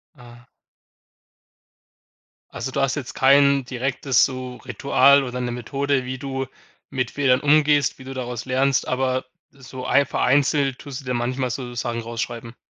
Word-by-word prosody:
Ah. 120 -1 -16 2.0
Also, 130 - -5
du 140 - -1
hast 135 +1 +1
jetzt 135 -4 -6
kein 140 +1 +4
direktes 130 0 +1
so 130 -1 -6
Ritual 140 +3 +3
oder 125 0 -5
'ne 120 -1 -2
Methode, 135 +2 -1
wie 130 +1 -4
du 135 0 -3 0.4
mit 130 -3 -2
Fehlern 135 -3 +2
umgehst, 150 -2 +3
wie - - -10
du 135 - -7
daraus 120 -2 -5
lernst, 130 +1 +1
aber 130 0 -1 0.3
so 130 -1 -10
einf 140 0 +3
vereinzelt 140 0 +2
tust 140 -1 -7
du - - -18
dir 125 - -2
manchmal 125 +2 -1
sozusagen 120 -2 -4
raus 115 0 -5
schreiben. 115 0 -6
130 Hz, 150 wpm, -22 LUFS, 125-140 Hz, 2.0 s, kein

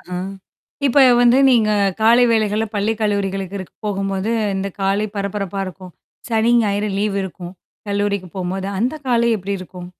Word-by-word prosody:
ஆஹா. 180 0 -6 0.7
இப்ப 270 +2 +3 0.2
வந்து 245 +2 +5
நீங்க 225 -4 +3 0.3
காலை 235 +2 +6
வேளைகள்ல 215 -1 +1
பள்ளி 210 +2 +1
கல்லூரிகளுக்கு 195 -2 -2
போகும்போது 195 +1 -2 0.3
இந்த 195 +1 -2
காலை 200 +2 +1
பரபரப்பா 200 -1 -3
இருக்கும். 185 -1 -10 0.4
சனி, 225 +1 +2
ஞாயிறு 205 0 0
லீவ் 205 -1 0
இருக்கும். 180 -1 -8 0.3
கல்லூரிக்கு 200 -2 -1
போம்போது, 190 +1 -3
அந்த 250 +7 0
காலை 235 -1 +2
எப்படி 200 +1 -5
இருக்கும்? 180 -1 -9
200 Hz, 140 wpm, -19 LUFS, 190-215 Hz, 0.7 s, காலை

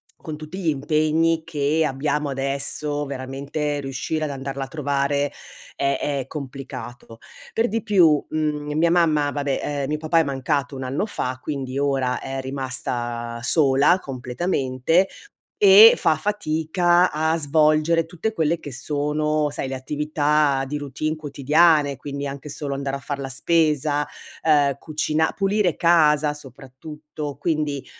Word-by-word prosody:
con 155 -1 -8
tutti 155 +4 -8
gli 170 -4 0
impegni 155 +3 +1
che 155 0 0
abbiamo 145 +1 -1
adesso, 140 +2 -2
veramente 140 +2 -4
riuscire 145 +3 -3
ad 155 - -2
andarla 135 0 -5
a - - -6
trovare 140 -1 -1 0.4
è 140 -1 0
è 140 -3 -2
complicato. 130 -5 -8 0.4
Per 225 +1 +2
di 225 0 -2
più, 170 -8 +4
mhmm, 150 -1 -2
mia 170 +1 +3
mamma, 155 -4 +2
vabbè, 140 -2 -1
ehm, 145 -2 -2
mio 150 - 0
papà 160 +2 +2
è - - +4
mancato 140 0 -2
un 130 - -5
anno 135 +9 -1
fa, 130 -11 -4
quindi 135 -3 -4
ora 135 -3 0
è 135 0 -4
rimasta 120 -3 -4
sola 140 +5 +4
completamente 135 +5 0 0.5
e 205 +3 +9
fa 155 - +2
fatica 175 -1 +1
a 160 +1 +1
svolgere 155 +2 +3
tutte 175 +7 -4
quelle 165 -3 0
che 145 - -9
sono, 150 +3 -1
sai, 140 - -4
le 135 - -4
attività 150 0 +1
di 150 +2 -3
routine 145 +2 -3
quotidiane. 150 0 +2
Quindi, 140 0 -5
anche 140 +1 -6
solo 145 -1 -3
andare 140 0 -3
a - - -5
far 140 0 -5
la 135 - -4
spesa, 150 0 +1 0.4
ehm 145 -3 +3
cucina 155 0 0
pulire 195 -3 +1
casa 155 -3 +3
soprattutto. 145 +2 -8
Quindi, 150 -4 -2
150 Hz, 140 wpm, -22 LUFS, 135-155 Hz, 0.5 s, e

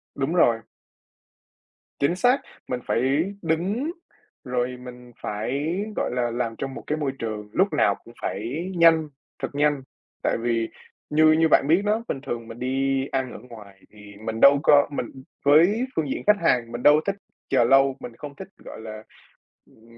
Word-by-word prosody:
Đúng 140 +4 -1
rồi. 115 -9 +4 1.4
Chính 155 +5 +2
xác, 250 +8 +3 0.3
mình 125 -1 -2
phải 145 +10 +1
đứng 190 - -1 0.5
rồi 125 0 -2
mình 125 -1 -11
phải, 135 +11 -2 0.2
gọi - - -1
là, 120 -1 -1
làm 115 -1 -2
trong 135 -1 -4
một - - -8
cái 150 - -1
môi 145 -3 -1
trường 105 -2 -5
lúc 190 -2 +2
nào 100 -9 +3
cũng 115 - -15
phải 155 - -3
nhanh, 165 -2 +5 0.3
thật - - -2
nhanh. 145 -1 +2 0.4
Tại - - +1
vì 115 -1 0 0.4
như 155 +1 +5
như 160 +1 +4
bạn - - +5
biết 170 +5 +4
đó, 220 +2 +1
bình 135 - -3
thường 115 -4 -5
mình 115 +1 -10
đi 135 +1 0
ăn 130 -2 -2
ở - - -8
ngoài 105 -5 -14
thì 105 -1 -14
mình 110 0 -3
đâu 140 0 +8
có 145 -1 +6
mình, - - -2
ừm, 130 -1 -12 0.2
với 175 - +5
phương 150 -4 -1
diện - - -3
khách 210 0 +6
hàng 115 -2 +2
mình 120 +1 -6
đâu 150 +1 +6
thích 200 - 0 0.3
chờ 130 -3 +4
lâu, 135 +2 +4
mình 115 - -9
không 145 -1 -9
thích, 190 - -9
gọi - - -11
là, 110 -1 -8 0.6
ừm, 115 +1 -21
135 Hz, 185 wpm, -24 LUFS, 120-155 Hz, 1.4 s, đâu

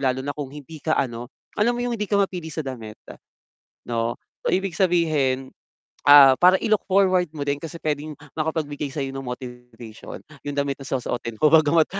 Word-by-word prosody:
lalo 130 -1 0
na 145 - -2
kung 145 -3 -6
hindi 150 +2 -11
ka 155 +1 0
ano, 120 -2 -2 0.2
alam 235 +3 +1
mo 245 - -2
yung 245 - -1
hindi 210 - -2
ka 205 - +2
mapili 185 -5 -1
sa 155 -2 -5
damit 115 -5 -7 0.9
'no. 115 0 0 0.3
Ibig 190 -2 0
sabihin, 155 -8 +1 0.6
ah, 140 -2 +10
para 180 +1 +6
i-look 215 0 +1
forward 185 -2 +3
mo 145 -2 -6
din 140 0 -1
kasi 165 +1 -7
puwedeng 150 -1 -3 0.2
makapagbigay 155 -2 -3
sa'yo 135 -1 -4
nung 135 -2 -6
motivation 125 -3 -9 0.2
yung 145 0 -6
damit 140 -1 -1
na - - -8
susuotin 120 -3 -3
mo. 150 +6 +3
Bagama't 160 0 +5
145 Hz, 175 wpm, -23 LUFS, 130-165 Hz, 0.9 s, ah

